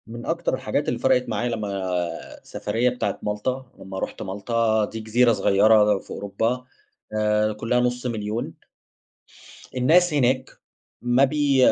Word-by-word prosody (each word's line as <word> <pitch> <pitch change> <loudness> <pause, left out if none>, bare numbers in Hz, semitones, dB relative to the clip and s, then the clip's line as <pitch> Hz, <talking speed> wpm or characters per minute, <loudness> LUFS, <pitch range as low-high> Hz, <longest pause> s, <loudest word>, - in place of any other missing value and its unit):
من 120 +1 -8
أكتر - - -1
الحاجات - - -1
اللي - - -1
فرقت 125 -1 +2
معايا 115 +2 -1
لمّا 110 -3 -3 0.7
السفرية 120 +2 -1
بتاعة 125 0 -3
مالطا، 125 +6 -2
لمّا 95 0 -7
رحت - - -5
مالطا، 110 +2 0
دي 110 - -7
جزيرة 115 +2 +3
صغيّرة 105 +1 +4
في - - -19
أوروبا 115 +5 -2 0.5
آآ 105 0 +1
كلّها 115 +3 0
نُص 125 0 -1
1000000 110 -1 -3 1.2
الناس 160 +7 +4
هناك 130 -2 +1 0.5
ما 120 +2 +3
بي 145 0 +2
115 Hz, 135 wpm, -24 LUFS, 105-125 Hz, 1.2 s, صغيّرة